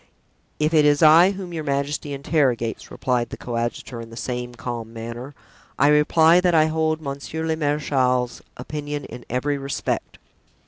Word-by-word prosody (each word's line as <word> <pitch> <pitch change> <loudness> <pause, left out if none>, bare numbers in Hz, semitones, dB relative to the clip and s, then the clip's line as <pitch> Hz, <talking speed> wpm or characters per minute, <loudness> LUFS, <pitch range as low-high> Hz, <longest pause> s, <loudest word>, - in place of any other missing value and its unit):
"If 155 +2 0
it 155 -2 +5
is 145 +1 +4
I 165 +4 +8
whom 185 -3 -7
your 160 -2 -3
majesty 145 +1 -2
interrogates," 135 -5 0
replied 125 -2 -1
the - - -7
coadjutor 120 0 -4
in 115 - -10
the 115 - -11
same 125 -1 -4
calm 115 -2 -5
manner, 120 +4 -7 0.4
"I 145 - +4
reply 160 +3 +5
that 180 -2 +2
I 155 -1 +6
hold 160 0 0
monsieur 140 +3 -5
le 160 0 0
marechal's 135 -5 0 0.2
opinion 145 +2 -5
in 120 +1 -10
every 140 +4 -1
respect." 140 0 -3
145 Hz, 155 wpm, -23 LUFS, 125-155 Hz, 0.4 s, I